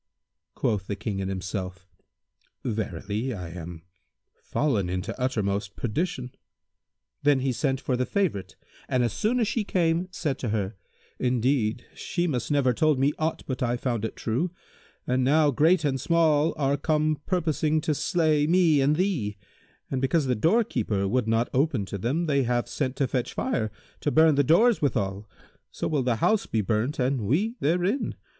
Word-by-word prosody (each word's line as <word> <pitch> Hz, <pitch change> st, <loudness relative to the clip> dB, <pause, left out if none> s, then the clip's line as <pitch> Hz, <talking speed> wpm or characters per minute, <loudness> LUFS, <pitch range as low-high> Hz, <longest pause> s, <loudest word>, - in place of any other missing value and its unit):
Quoth 100 Hz, -3 st, -1 dB
the 100 Hz, -, -2 dB
King 100 Hz, 0 st, -4 dB
in 95 Hz, 0 st, -2 dB
himself, 95 Hz, 0 st, -5 dB, 0.8 s
"Verily, 105 Hz, +2 st, -3 dB
I 90 Hz, -4 st, -6 dB
am 85 Hz, -1 st, -8 dB, 0.6 s
fallen 110 Hz, -12 st, 0 dB
into 90 Hz, +1 st, -3 dB
uttermost 100 Hz, -5 st, -1 dB
perdition." 125 Hz, -, -3 dB, 0.9 s
Then 145 Hz, -2 st, +3 dB
he 135 Hz, 0 st, +1 dB
sent 135 Hz, +1 st, 0 dB
for 130 Hz, -, -1 dB
the 125 Hz, 0 st, -1 dB
favourite; 100 Hz, -, -1 dB, 0.3 s
and, 125 Hz, -1 st, +2 dB
as 115 Hz, -3 st, 0 dB
soon 240 Hz, +4 st, 0 dB
as 225 Hz, -, +2 dB
she 225 Hz, +1 st, 0 dB
came, 175 Hz, -2 st, +1 dB
said 150 Hz, -7 st, -3 dB
to 120 Hz, -, -2 dB
her, 105 Hz, -1 st, -2 dB, 0.4 s
"Indeed, 125 Hz, -2 st, +1 dB
Shimas 170 Hz, -8 st, -2 dB
never 140 Hz, -4 st, +3 dB
told 155 Hz, +3 st, +2 dB
me 140 Hz, +3 st, +2 dB
aught 160 Hz, +1 st, -1 dB
but 130 Hz, -2 st, -4 dB
I 120 Hz, -1 st, +1 dB
found 120 Hz, -3 st, -2 dB
it 110 Hz, -, -3 dB
true, 125 Hz, +11 st, -1 dB, 0.6 s
and 125 Hz, +1 st, +1 dB
now 150 Hz, +2 st, +4 dB
great 160 Hz, +5 st, +3 dB
and 135 Hz, -3 st, 0 dB
small 160 Hz, -1 st, +3 dB
are 140 Hz, -1 st, +1 dB
come 155 Hz, 0 st, 0 dB
purposing 155 Hz, -4 st, +1 dB
to 155 Hz, -, 0 dB
slay 155 Hz, -2 st, +1 dB
me 165 Hz, -4 st, +4 dB
and 145 Hz, +3 st, +3 dB
thee; 155 Hz, -, -1 dB, 0.5 s
and 130 Hz, -2 st, -1 dB
because 140 Hz, +3 st, +2 dB
the 130 Hz, -, +1 dB
doorkeeper 120 Hz, -, +1 dB
would 120 Hz, +2 st, 0 dB
not 115 Hz, +1 st, +2 dB
open 130 Hz, -6 st, +1 dB
to 100 Hz, +1 st, -6 dB
them, 140 Hz, -, 0 dB
they 140 Hz, -3 st, +2 dB
have 120 Hz, -1 st, 0 dB
sent 130 Hz, -3 st, -2 dB
to 135 Hz, -, 0 dB
fetch 125 Hz, -2 st, -2 dB
fire, 110 Hz, -1 st, -1 dB, 0.3 s
to -, -, 0 dB
burn 160 Hz, +1 st, +5 dB
the 145 Hz, 0 st, +3 dB
doors 210 Hz, -, +4 dB
withal; 105 Hz, -7 st, -1 dB, 0.4 s
so -, -, -4 dB
will 150 Hz, -3 st, +1 dB
the 125 Hz, -2 st, +1 dB
house 215 Hz, -, +1 dB
be 110 Hz, -, 0 dB
burnt 110 Hz, +8 st, -1 dB
and 130 Hz, -1 st, 0 dB
we 170 Hz, -, +1 dB
therein. 180 Hz, -, 0 dB
130 Hz, 170 wpm, -26 LUFS, 110-155 Hz, 0.9 s, burn